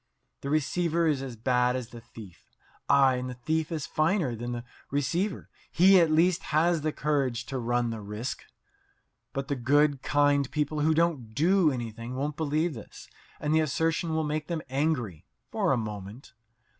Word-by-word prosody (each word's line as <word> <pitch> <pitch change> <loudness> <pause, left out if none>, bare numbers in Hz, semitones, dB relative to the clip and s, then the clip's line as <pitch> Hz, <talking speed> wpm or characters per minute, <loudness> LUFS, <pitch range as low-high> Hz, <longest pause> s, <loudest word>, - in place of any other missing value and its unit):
The 140 - -4
receiver 165 +3 +1
is 150 -4 +1
as 130 -3 -6
bad 125 +2 +1
as 125 -2 -4
the 120 -1 -11
thief 110 -5 -14 0.4
ay, 135 -2 +5
and 125 0 -4
the 125 - -6
thief 155 +6 -2
is 155 -4 -3
finer 155 - 0
than 120 +2 -5
the 120 -1 -4 0.3
receiver; 155 +9 -1 0.2
he 190 +2 +6
at 165 -2 +4
least 170 +3 +3
has 165 +1 +2
the 155 +1 0
courage 140 -6 -1
to 135 - -4
run 120 0 0
the 110 -1 -5
risk. 105 +5 -5 0.9
But 135 0 -4
the 145 - -1
good, 140 +2 +2
kind 145 -1 +2
people 150 0 -1
who 155 +1 +2
don't 150 -10 0
do 175 - +4
anything 120 -1 -5
won't 145 +2 -2
believe 155 +2 0
this, 110 -5 -11 0.3
and 150 +1 -1
the 160 - +4
assertion 160 +2 0
will 160 - +1
make 150 0 -2
them 165 -3 -3
angry 125 - -1 0.2
for 200 -5 +1
a 135 - +3
moment. 105 +2 -7
145 Hz, 175 wpm, -28 LUFS, 125-160 Hz, 0.9 s, he